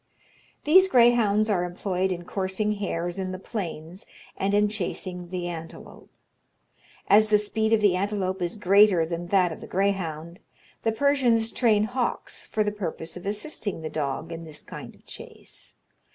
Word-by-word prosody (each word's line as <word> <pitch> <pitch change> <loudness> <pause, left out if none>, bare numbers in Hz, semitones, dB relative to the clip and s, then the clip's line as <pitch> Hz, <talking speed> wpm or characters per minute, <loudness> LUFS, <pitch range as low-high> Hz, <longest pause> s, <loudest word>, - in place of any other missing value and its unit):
"These 370 +6 +6
greyhounds 235 - +4
are 190 -5 +1
employed 185 +1 -1
in 175 -1 -4
coursing 195 +3 -1
hares 175 -2 -3
in 185 -1 -3
the 185 - -4
plains, 180 -4 -6 0.3
and 200 +1 0
in 210 0 +4
chasing 180 -3 -4
the 180 -1 -3
antelope. 165 -2 -9 1.0
As 215 +1 +6
the 210 -1 +5
speed 220 +1 -1
of 225 -1 +4
the 200 -3 +4
antelope 190 -1 -1
is 175 +2 -2
greater 200 -3 +5
than 170 +1 -4
that 180 -2 +3
of - - -8
the - - -9
greyhound, 180 -3 -2 0.4
the 225 - +1
Persians 240 -3 +2
train 215 -4 +3
hawks 245 +2 -3
for 215 - 0
the 210 - -1
purpose 170 -5 -5
of 180 +2 -8
assisting 210 - -3
the 155 - -4
dog 155 +2 -3
in 165 0 -6
this 155 -2 -10
kind - - -9
of - - -25
chase. - - -10
195 Hz, 165 wpm, -26 LUFS, 175-215 Hz, 1.0 s, These